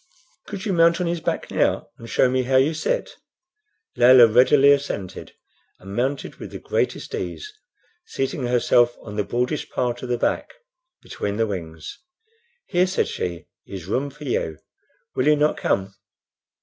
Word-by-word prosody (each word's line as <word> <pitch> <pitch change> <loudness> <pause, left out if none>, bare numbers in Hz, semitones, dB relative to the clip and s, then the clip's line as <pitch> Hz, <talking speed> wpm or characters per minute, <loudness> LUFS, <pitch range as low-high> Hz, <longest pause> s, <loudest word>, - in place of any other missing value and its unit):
"Could 200 0 -6
you 200 - 0
mount 170 0 +4
on 180 - 0
his 170 -1 -2
back - - -3
now, - - 0
and 115 - -10
show - - +3
me 130 +1 +1
how 130 +1 -1
you 135 +5 +4
sit?" - - -2 0.8
Layelah 125 0 +8
readily 135 +3 +6
assented, 135 -10 -2 0.5
and 95 +2 -9
mounted 135 +4 -2
with - - -8
the - - -7
greatest - - -2
ease, 425 0 -5 0.5
seating 135 -1 -2
herself 120 0 +3
on 105 -2 -8
the 105 - 0
broadest 125 +7 -2
part 120 -1 -2
of 125 - -6
the 120 - +1
back - - -1 0.5
between 100 0 -4
the 115 - +2
wings. 80 -6 -7 0.7
"Here," 180 +1 +2
said 185 - 0
she, 85 -3 -4 0.2
"is 95 -4 -8
room 130 +9 -1
for 150 +2 -13
you. 80 - -2 0.6
Will 130 - 0
you 150 - +6
not 150 +1 +2
come?" 95 0 -1
125 Hz, 160 wpm, -23 LUFS, 105-150 Hz, 0.8 s, Layelah